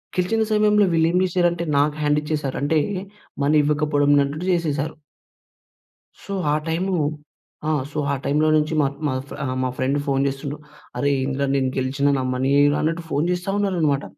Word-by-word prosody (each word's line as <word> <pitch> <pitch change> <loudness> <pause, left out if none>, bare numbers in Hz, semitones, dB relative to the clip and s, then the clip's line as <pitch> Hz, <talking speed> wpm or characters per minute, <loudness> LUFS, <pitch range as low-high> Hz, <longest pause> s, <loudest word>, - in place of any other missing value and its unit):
గెలిచిన 205 +5 +1
సమయంలో 210 -1 +4
వీళ్ళేమి 165 +2 +3
చేషారంటే 175 -1 +1
నాకు 145 +1 +2
హ్యాండిచ్చేశారు. 150 -1 -1
అంటే, 155 +2 +2 0.6
మనీ 145 +2 +3
ఇవ్వకపోడం 145 -1 +1
నట్టుడు 145 +5 -3
జేసేశారు. 155 -3 -1 1.3
సో, 200 - -6 0.2
ఆ - - +3
టైమూ 180 +4 0 0.7
ఆ! - - +2 0.2
సో, 150 - -7
ఆ - - +1
టైమ్‌లో 150 +2 +2
నుంచి 155 +1 0
మత్ 140 0 -1
మాఫ్ 130 0 -4
ఆహ్, 130 -1 -2
మా 130 - 0
ఫ్రెండ్ 135 +2 0
ఫోన్‌ 135 -1 +1
చేస్తుండు. 140 +2 -4 0.4
"అరే 145 - +1
ఏందిరా! 135 +1 -1
నేను 130 -1 +1
గెలిచినా, 135 +2 +1
నా 130 - -1
మనీ 130 +2 0
ఎయిరా" 145 0 +3
అన్నట్టు 165 +2 -1
ఫోన్ 145 +3 +1
చేస్తా 180 +2 -3
ఉన్నారనమాట. 170 -9 +1
150 Hz, 155 wpm, -22 LUFS, 140-170 Hz, 1.3 s, సమయంలో